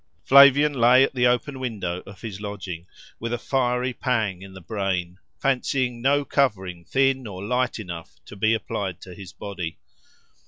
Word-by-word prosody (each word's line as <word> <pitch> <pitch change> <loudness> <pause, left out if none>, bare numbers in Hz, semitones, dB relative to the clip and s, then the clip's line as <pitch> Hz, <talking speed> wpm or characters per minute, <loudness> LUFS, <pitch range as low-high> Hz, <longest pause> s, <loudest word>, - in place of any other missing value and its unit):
Flavian 140 +2 +7
lay 125 0 +6
at 135 - 0
the 125 -1 +3
open 125 +3 0
window 95 -8 -3
of 100 -1 -12
his 105 -4 -7
lodging, 95 -4 -6 0.3
with 115 0 -4
a 120 - 0
fiery 125 0 0
pang 110 -8 -1
in 95 0 -11
the - - -9
brain, 95 -2 -3 0.2
fancying 130 -2 0
no 140 +2 +2
covering 95 -12 0
thin 135 +2 +1
or 95 -2 -7
light 125 +2 0
enough 85 -6 -8
to - - -11
be 110 +3 +2
applied 100 -4 -4
to 90 - -10
his 95 0 -10
body. 90 -6 -6
115 Hz, 165 wpm, -24 LUFS, 95-130 Hz, 0.3 s, Flavian